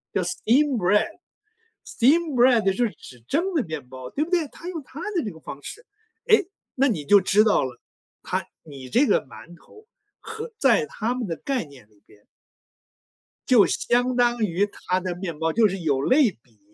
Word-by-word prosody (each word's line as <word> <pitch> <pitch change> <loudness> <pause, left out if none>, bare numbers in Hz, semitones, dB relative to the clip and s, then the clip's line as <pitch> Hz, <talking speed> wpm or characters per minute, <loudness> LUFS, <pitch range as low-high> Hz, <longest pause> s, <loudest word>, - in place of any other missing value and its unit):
叫 185 - +1
steamed 250 +9 +1
bread，steamed 335 - -1
bread 240 -2 +5
就 195 - +4 0.2
是 - - -6
指 125 - -14
蒸 360 +5 0
的 315 - +2
面 155 -7 -7
包， 130 -1 -9
对 300 - -1
不 345 - -8
对？ 340 -4 +1
它 335 +5 -10
用 330 -4 -5
它 285 +5 -10
的 350 -6 -1
这 210 - -3
个 160 - -14
方 140 - -9
式， 470 - -10 0.4
哎， 435 -2 +6 0.3
那 275 +2 +3
你 170 - -2
就 205 +6 +6
知 200 +3 +3
道 210 -10 +2
了， 125 -2 -9 0.4
它 - - -3 0.2
你 135 -4 -11
这 255 - +3
个 205 - +2
馒 165 +5 -13
头 430 - -19 0.4
和 450 +1 -7
在 465 - +3
它 235 - -3
们 250 -3 -4
的 165 - -3
概 260 - -3
念 130 -7 -17
里 105 -1 -29
边 105 - -23 1.2
就 240 -6 +6
相 245 +1 0
当 240 -1 +2
于 195 +1 +1
它 185 -2 -3
的 180 -1 -4
面 175 -4 -6
包， 160 0 -1
就 225 -1 +4
是 195 - -4
有 140 -5 0
类 260 - +4
比， 115 -5 -29
220 Hz, 280 characters per minute, -24 LUFS, -, 1.2 s, 哎